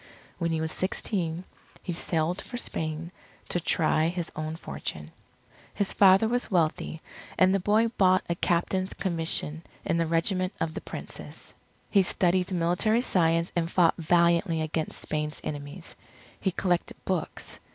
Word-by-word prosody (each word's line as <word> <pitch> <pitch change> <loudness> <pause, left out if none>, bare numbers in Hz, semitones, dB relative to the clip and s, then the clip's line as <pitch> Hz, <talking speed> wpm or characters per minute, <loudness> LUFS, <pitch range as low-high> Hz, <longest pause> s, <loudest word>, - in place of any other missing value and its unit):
When 170 -1 0
he 165 -1 0
was 160 0 -2
sixteen, 180 -3 -2 0.4
he 180 - -3
sailed 165 +1 -1
for 245 - -7
Spain 160 -6 -2 0.4
to 175 - +1
try 160 -1 +2
his 175 -1 -3
own 155 +1 -3
fortune. 75 - -6 0.6
His 200 - 0
father 195 +2 +6
was 245 +2 0
wealthy, 160 -2 0 0.3
and 185 0 +5
the 195 - +3
boy 210 +5 +3
bought 185 -1 +5
a 170 - +1
captain's 180 +2 0
commission 165 -3 -1 0.2
in 165 - +1
the 165 -1 +1
Regiment 185 +3 +1
of 165 -1 -1
the - - -5
Princess. - - -9 0.4
He 200 - +6
studied 180 0 +1
military 180 +6 +2
science 165 -6 +2
and 165 -1 0
fought 170 -2 +4
valiantly 170 0 +3
against 155 0 -2
Spain's 150 0 -2
enemies. 145 +4 -6 0.4
He 195 - +1
collected 180 -1 -1
books. 185 -4 -3
170 Hz, 145 wpm, -28 LUFS, 160-185 Hz, 0.6 s, father